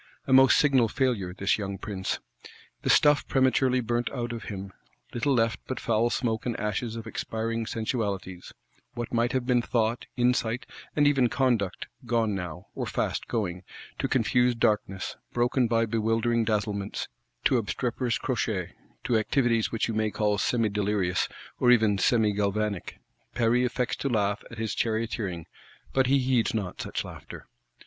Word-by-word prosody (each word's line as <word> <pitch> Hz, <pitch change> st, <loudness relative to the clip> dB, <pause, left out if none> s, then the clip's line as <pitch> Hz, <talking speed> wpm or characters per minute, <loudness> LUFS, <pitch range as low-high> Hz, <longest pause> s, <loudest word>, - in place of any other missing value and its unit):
A 130 Hz, -, +1 dB
most 130 Hz, 0 st, +7 dB
signal 135 Hz, -5 st, +4 dB
failure, 115 Hz, -7 st, 0 dB
this 100 Hz, +4 st, 0 dB
young 100 Hz, -1 st, -4 dB
Prince! 95 Hz, -3 st, -3 dB, 0.6 s
The -, -, -2 dB
stuff 145 Hz, -1 st, +5 dB
prematurely 130 Hz, -1 st, +3 dB
burnt 120 Hz, +1 st, -1 dB
out 120 Hz, -2 st, -4 dB
of 115 Hz, -, -6 dB
him: 95 Hz, -2 st, -6 dB, 0.4 s
little 130 Hz, +4 st, 0 dB
left 115 Hz, -1 st, +1 dB
but 130 Hz, -, -3 dB
foul 115 Hz, +1 st, +1 dB
smoke 115 Hz, -3 st, -1 dB
and 120 Hz, -, -2 dB
ashes 105 Hz, +2 st, -2 dB
of 115 Hz, -1 st, -6 dB
expiring 115 Hz, 0 st, -3 dB
sensualities: 100 Hz, -6 st, -3 dB, 0.4 s
what 120 Hz, 0 st, -5 dB
might 120 Hz, +1 st, +2 dB
have 130 Hz, -2 st, 0 dB
been 125 Hz, -1 st, +3 dB
Thought, 115 Hz, 0 st, 0 dB
Insight, 120 Hz, 0 st, +1 dB, 0.3 s
and 150 Hz, -, +4 dB
even 135 Hz, -4 st, +4 dB
Conduct, 120 Hz, -9 st, 0 dB, 0.2 s
gone 115 Hz, -2 st, +1 dB
now, 90 Hz, -1 st, -5 dB
or -, -, -3 dB
fast -, -, -2 dB
going,—to 90 Hz, -6 st, -4 dB
confused 125 Hz, -1 st, +2 dB
darkness, 100 Hz, -4 st, 0 dB, 0.2 s
broken 120 Hz, +1 st, +2 dB
by 115 Hz, 0 st, +2 dB
bewildering 115 Hz, +1 st, +1 dB
dazzlements; 105 Hz, -2 st, -2 dB, 0.4 s
to 130 Hz, -, +4 dB
obstreperous 120 Hz, +4 st, -1 dB
crotchets; -, -, -2 dB, 0.3 s
to 115 Hz, -2 st, +2 dB
activities 115 Hz, 0 st, +1 dB
which 115 Hz, -, 0 dB
you 115 Hz, -, -2 dB
may 110 Hz, 0 st, +1 dB
call 105 Hz, -1 st, 0 dB
semi 115 Hz, -1 st, +1 dB
delirious, 100 Hz, -3 st, 0 dB, 0.3 s
or 125 Hz, -, +4 dB
even 110 Hz, -5 st, +4 dB
semi 110 Hz, 0 st, +3 dB
galvanic! 100 Hz, -1 st, -1 dB, 0.4 s
Paris 120 Hz, +2 st, +3 dB
affects 125 Hz, 0 st, -2 dB
to 140 Hz, -, -2 dB
laugh 105 Hz, -2 st, 0 dB
at 115 Hz, -, -10 dB
his 110 Hz, -1 st, -2 dB
charioteering; 110 Hz, -6 st, -2 dB, 0.5 s
but 130 Hz, -1 st, +3 dB
he 140 Hz, +2 st, +4 dB
heeds 125 Hz, -4 st, +1 dB
not 100 Hz, -5 st, -3 dB
such -, -, -3 dB
laughter. -, -, -10 dB
115 Hz, 155 wpm, -27 LUFS, 105-125 Hz, 0.6 s, most